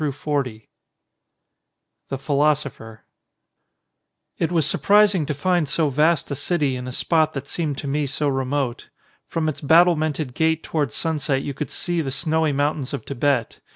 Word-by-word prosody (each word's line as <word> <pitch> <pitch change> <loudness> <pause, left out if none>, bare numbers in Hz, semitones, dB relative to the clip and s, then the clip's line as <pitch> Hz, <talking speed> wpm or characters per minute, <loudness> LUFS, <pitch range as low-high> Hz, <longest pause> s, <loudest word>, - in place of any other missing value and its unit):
146 140 -6 -2
XXXVIII - - -48 1.4
THE 135 - -2
PHILOSOPHER 140 -5 -1 1.4
IT 165 - 0
was 165 -4 +2
surprising 200 -5 +3
to 150 - -2
find 175 0 +1
so 160 -3 +1
vast 150 +2 +2
a - - -1
city 145 -2 0
in 125 0 -6
a - - -4
spot 155 +4 +1
that 140 - -5
seemed 155 -5 -2
to 140 - -5
me 145 +1 0
so 145 +2 -1
remote. 135 -2 -2 0.4
From 160 -1 -2
its 155 - -3
battlemented 155 -3 +3
gate 160 +2 +1
towards 145 -7 -2
sunset 145 -4 -1
you 140 - -4
could 145 0 -5
see 175 -1 -1
the 140 - -3
snowy 155 +3 +1
mountains 145 -1 -1
of - - -8
Tibet. 135 -3 -1
145 Hz, 155 wpm, -22 LUFS, 135-160 Hz, 1.4 s, surprising